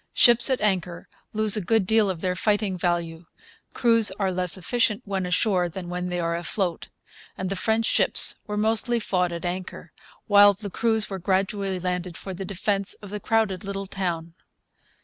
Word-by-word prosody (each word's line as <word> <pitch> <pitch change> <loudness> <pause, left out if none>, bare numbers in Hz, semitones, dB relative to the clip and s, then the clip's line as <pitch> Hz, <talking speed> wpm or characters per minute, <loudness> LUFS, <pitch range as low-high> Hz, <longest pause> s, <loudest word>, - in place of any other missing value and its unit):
Ships 240 0 +5
at 260 - 0
anchor 180 -4 -1 0.2
lose 215 -1 +3
a 210 - -2
good 215 +2 +1
deal 220 0 +2
of 175 -3 -4
their 180 -1 -1
fighting 205 -1 0
value. 170 -2 -3 0.5
Crews 230 -3 +3
are 195 -1 -2
less 180 0 -2
efficient 230 +3 -1
when 190 -2 -3
ashore 180 -1 0
than 175 +1 -8
when 180 0 -4
they 175 0 -3
are 170 0 -1
afloat; 175 0 -3 0.5
and 185 0 -4
the - - -1
French 220 +3 0
ships - - +6
were 210 0 -4
mostly 225 +2 +2
fought 180 -4 -1
at 170 +1 -6
anchor, 180 +1 -6 0.3
while 205 -1 +6
the 200 0 -9
crews 220 +1 +1
were 190 - -4
gradually 195 +1 -1
landed 180 -1 -4
for 190 - -7
the 190 +2 -6
defence 195 +1 -2
of 205 -2 -12
the 210 - -5
crowded 215 -4 -1
little 195 0 -5
town. 170 -4 -4
195 Hz, 180 wpm, -24 LUFS, 180-210 Hz, 0.5 s, ships